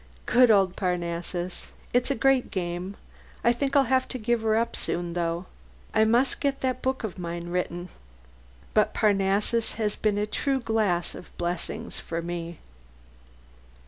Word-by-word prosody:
Good 250 0 +5
old 195 -3 +4
Parnassus! 175 -1 -2 0.2
It's 245 +2 +2
a 275 - +1
great 265 +1 +3
game.... 180 +1 -3 0.5
I 235 - +5
think 275 +3 -1
I'll 280 - +7
have 260 0 +2
to 255 - -4
give 240 0 0
her 220 -1 +2
up 230 +1 0
soon, 175 0 -1
though: 170 +1 -1 0.5
I 220 0 +5
must 240 +4 +3
get 280 -1 0
that 255 -1 -1
book 260 -1 -1
of 195 -4 -4
mine 170 0 -4
written. 175 0 -2 0.8
But 215 - +3
Parnassus 205 +2 +2
has 215 -2 -1
been 210 -2 +1
a 205 - +1
true 270 +5 0
glass 215 -7 +1
of - - -10
blessings 175 0 -3
to 165 - -1
me. 170 -1 -5
210 Hz, 155 wpm, -27 LUFS, 175-240 Hz, 0.8 s, I'll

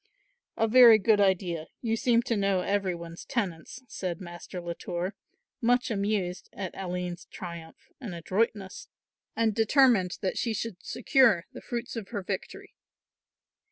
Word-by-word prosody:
"A 225 - +2
very 235 -1 +9
good 210 0 +3
idea; 180 -4 +1
you 225 -2 0
seem 235 0 +2
to 235 - -1
know 195 -2 +1
every 195 -2 0
one's 170 0 -9
tenants," 205 +2 -4
said 185 -6 -4
Master 175 0 -8
Latour, 175 +2 -4 0.5
much 245 +1 +2
amused 200 -4 -1
at 190 -3 -5
Aline's 180 -2 -4
triumph 170 -3 -10
and 215 -10 -6
adroitness, 190 +3 -2 0.5
and 225 -1 +2
determined 225 -4 +3
that 190 - -1
she 230 -2 -1
should 205 -3 -5
secure 235 - +3
the - - -9
fruits 240 0 -5
of 220 -4 -5
her 205 -5 -4
victory. 190 0 -6
195 Hz, 140 wpm, -28 LUFS, 180-225 Hz, 0.5 s, very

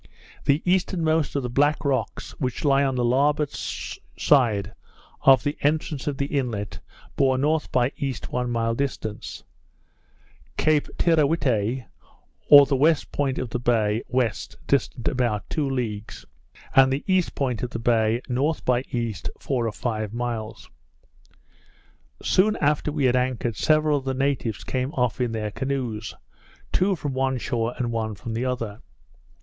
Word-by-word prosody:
The 145 +3 +2
easternmost 165 -5 +1
of 140 - 0
the 125 - -3
Black 145 +4 +2
Rocks, 140 -2 -1
which 130 +1 -2
lie 140 -1 +4
on 135 -2 0
the 125 -1 +1
larboard 145 +4 +2
side 110 -8 0 0.5
of 135 -3 +6
the 145 0 -1
entrance 150 -1 0
of 145 -2 -1
the 140 - 0
inlet, 120 -8 -3 0.4
bore 135 -2 +3
N. 150 +4 +2
by 125 +1 +2
E., 135 -2 -2 0.2
one 125 0 -1
mile 115 -1 0
distant; 115 -5 -4 1.1
Cape 155 -2 +2
Teerawhitte, 135 - +2 0.6
or 145 -1 +10
the 140 0 0
west 155 +3 +2
point 135 -2 -1
of 125 -2 -4
the 125 - -2
bay, 115 -2 +1
west, 125 -3 -1
distant 135 -3 0
about 120 -6 0
two 145 -3 0
leagues; 115 -5 -4 0.5
and 135 0 +7
the 135 +2 -1
east 185 -2 +1
point 125 -5 -1
of 125 - -2
the 115 - -5
bay 115 0 +1
N. 125 0 -1 0.3
by 125 -1 +2
east, 115 -5 -3
four 125 -4 -1
or - - -1
five 110 -1 -3
miles. 115 -3 -4 1.6
Soon 210 +3 +3
after 150 +1 +1
we 145 -2 0
had 125 -1 +3
anchored, 125 -3 0
several 155 +1 +3
of 135 - -14
the 135 -1 -1
natives 135 -5 -1
came 130 +1 -2
off 125 0 0
in 120 -2 0
their 105 -2 -3
canoes; 125 -5 -3 0.6
two 190 +1 +2
from 145 -4 -4
one 130 0 0
shore, 120 -1 -2
and 120 -2 -1
one 110 -2 -2
from 115 +3 -6
the 120 +3 -1
other. 115 -5 -3
130 Hz, 155 wpm, -24 LUFS, 115-140 Hz, 1.6 s, or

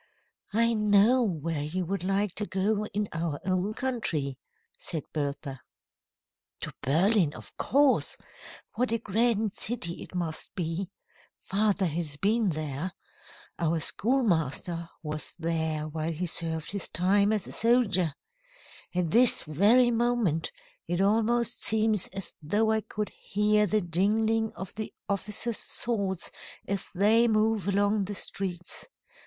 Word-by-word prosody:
"I 230 +1 +4
know 210 +3 +4
where 165 -7 -1
you 175 +5 -2
would 195 +2 -3
like 195 0 0
to 210 +1 -1
go 205 +2 0
in 205 0 -2
our 165 -3 -2
own 185 +3 0
country," 155 - -2 0.4
said 160 -5 -4
Bertha. 140 -2 -4 1.0
"To - - -4
Berlin, 170 +3 +3
of - - -12
course. 280 0 +3 0.6
What 245 +1 0
a 230 - +2
grand 220 -1 +1
city 200 -6 -1
it - - -10
must 165 -3 -3
be! 175 +1 -3 0.5
Father 200 -1 +1
has 160 -3 -2
been 215 +4 +2
there. 155 +2 -3 0.7
Our 165 0 +1
schoolmaster 170 - +1
was 155 0 -6
there 160 -2 -1
while 155 +1 -3
he 170 +3 -3
served 160 -1 +1
his 200 -3 -1
time 200 +4 +3
as 210 -3 0
a - - -8
soldier. 205 - +2 0.8
At 175 -3 0
this 240 +4 +4
very 215 - +4
moment, 230 -9 +1 0.4
it 175 - -1
almost 230 +4 +2
seems 215 -3 +2
as 195 -2 -7
though 210 +8 +1
I 220 0 +1
could 210 +1 -4
hear 210 +1 +1
the 215 +3 +1
jingling 215 +6 +1
of 190 - -7
the 215 0 -5 0.2
officers' 210 +3 -1
swords 200 -6 -1 0.4
as 200 -1 -2
they 220 +5 +4
move 215 -3 +1
along 200 +1 +2
the 205 +2 -4
streets. 180 -3 -3
195 Hz, 135 wpm, -28 LUFS, 165-220 Hz, 1.0 s, I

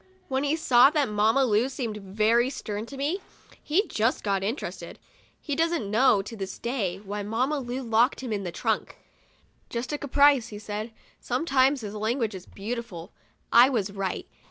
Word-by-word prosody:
When 265 +1 0
he 290 +2 +1
saw 260 -4 +6
that 295 -4 +1
Mamma 220 +6 +3
Lu 230 +2 +2
seemed 235 -6 -4
very 215 +5 +2
stern 215 -4 -5
to 275 - -9
me, 305 +8 -1 0.4
he 365 +8 +1
just 225 +4 0
got 195 -2 0
interested. 225 +9 -4 0.4
He 290 - -3
doesn't 325 -9 0
know, 220 -3 +4
to 225 - -8
this 195 -2 -6
day, 220 -7 -2
why 205 +1 -5
Mamma 250 +8 -1
Lu 255 +1 -4
locked 235 +3 +2
him 245 -4 -3
in 200 -1 -2
the 175 - -4
trunk. - - -2 0.7
"Just 245 +4 -4
a 295 - -2
caprice,*' 285 -3 +4
he 210 - -8
said. 210 +2 -5 0.3
Sometimes 265 0 +1
his 210 -2 -6
language 220 +1 -1
is 185 -1 -9
beautiful. 210 -4 -6 0.4
I 240 +3 +8
was 215 -7 -1
right. 195 -1 -4
235 Hz, 175 wpm, -26 LUFS, 210-270 Hz, 0.7 s, I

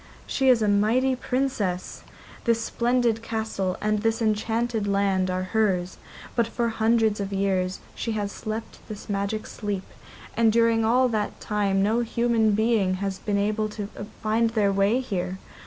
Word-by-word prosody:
She 265 -1 +1
is 240 -3 +5
a - - +2
mighty 225 +6 +3
Princess. 245 -8 -2 0.4
This 230 -1 +3
splendid 235 0 +1
castle 220 -5 -2
and 215 0 +1
this 225 0 +1
enchanted 225 0 0
land 195 -2 +1
are 185 0 -1
hers, 185 -5 +1 0.4
but 235 -2 +2
for 235 0 -1
hundreds 225 -1 +2
of 200 0 -3
years 190 -1 0
she 230 - -3
has 205 -2 -2
slept 220 +2 -6
this 210 -1 -8
magic 200 +2 -2
sleep, 205 -3 -4 0.5
and 230 -1 +4
during 230 0 +3
all 250 +3 +4
that 215 -2 -2
time 200 -2 0
no 220 +3 +2
human 235 -2 +2
being 215 -3 +2
has 195 0 -3
been 205 -1 -1
able 215 +1 0
to 210 -1 -6 0.3
find 225 +1 +2
their 215 -3 +2
way 200 +6 +2
here. 185 -6 -3
215 Hz, 155 wpm, -25 LUFS, 200-230 Hz, 0.5 s, is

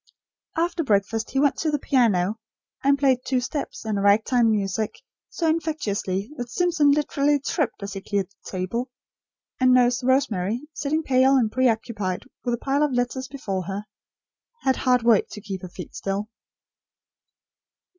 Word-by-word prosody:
After 340 0 0
breakfast, 220 -1 0
he 270 - 0
went 285 0 +3
to 315 - 0
the 295 - +1
piano, 220 -7 +2 0.4
and 280 +1 +4
played 265 -3 +3
two 260 -1 +1
steps, 265 -1 -5
and 210 -2 -1
rag 205 +2 +4
time 245 -3 +3
music, 210 0 -1 0.3
so 335 - -3
infectiously, 265 - -1
that 245 -2 -5
Simpson 340 -1 +2
literally 290 0 +2
tripped 280 - -2
as 200 -1 -5
he 195 - -5
cleared 200 -1 -2
the - - -14
table; 200 +7 -3 0.7
and 255 -1 +5
Nurse 245 0 +3
Rosemary, 235 -5 +1
sitting 300 +2 -1
pale 265 -1 +4
and 230 -5 +2
preoccupied, 220 -6 0 0.2
with 240 -1 0
a 240 - -14
pile 275 +1 +2
of 300 -2 +2
letters 250 +2 -1
before 200 -9 -4
her, 200 +3 -4 0.8
had 265 -1 +2
hard 250 -2 +2
work 230 -3 +4
to - - -8
keep 195 -3 -6
her 185 - -7
feet 180 -1 -9
still. 200 +2 -3
245 Hz, 160 wpm, -24 LUFS, 205-275 Hz, 0.8 s, and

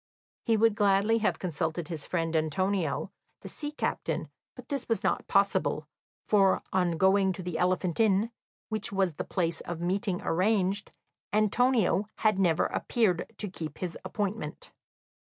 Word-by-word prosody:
He 225 -1 +2
would 225 0 +4
gladly 205 +2 +3
have 215 - +1
consulted 165 -1 -2
his 160 -3 -4
kind - - -16
friend 165 -2 -1
Antonio, 160 0 0 0.3
the - - -8
sea 295 - -5
captain, 300 - -2 0.3
but - - -12
this 280 -4 -3
was 225 -4 0
not - - 0
possible, 200 0 +2 0.4
for 195 -2 +3
on 180 -2 +2
going 190 +2 +3
to 185 - -7
the 175 -2 -3
Elephant 180 0 +1
Inn, 215 +1 +3 0.4
which 215 -1 -2
was 190 -3 +1
the - - -4
place 170 -3 -1
of 175 -1 -5
meeting 185 +2 -1
arranged, 195 +2 +1 0.4
Antonio 215 -1 +2
had 215 -3 +2
never 175 -4 +3
appeared 205 -8 0
to 210 - -1
keep 160 -5 -7
his 180 -2 -4
appointment. 190 -4 -4
190 Hz, 155 wpm, -29 LUFS, 175-210 Hz, 0.4 s, would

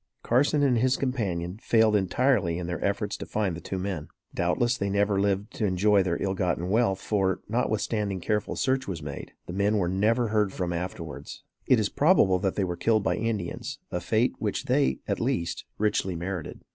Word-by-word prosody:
Carson 145 +4 +3
and 125 -4 +3
his 130 +2 +2
companion 100 -8 -2
failed 110 -2 +4
entirely 100 -2 +2
in 90 - -4
their 85 0 -4
efforts 100 +1 -1
to - - -6
find 100 -5 -1
the 85 - -8
two 95 - -4
men. 90 -5 -3 0.3
Doubtless 120 +8 +1
they 100 -4 -2
never 100 0 +2
lived 100 +1 0
to 110 - -1
enjoy 100 +2 +3
their 90 -2 -1
ill 95 -1 0
gotten 90 -1 -1
wealth; 105 -4 +2
for, 95 -3 0
notwithstanding 105 -3 -1
careful 105 +3 -1
search 130 -1 0
was 85 -6 -4
made, 70 -2 -7
the 90 - -7
men 100 +3 +2
were 90 -4 +1
never 110 +6 +2
heard 105 -2 +2
from 90 -2 -2
afterwards. 85 -3 -6 0.2
It 125 - +5
is 105 -2 +1
probable 140 - +4
that 95 0 -1
they 100 - +1
were 90 -2 -2
killed 110 +3 +2
by - - +1
Indians, 110 -6 -3
a - - -1
fate - - +1
which - - -2
they, 65 0 +1
at - - -1
least, 85 0 -1
richly 105 -3 0
merited. 85 -1 -5
100 Hz, 195 wpm, -27 LUFS, 90-110 Hz, 0.3 s, It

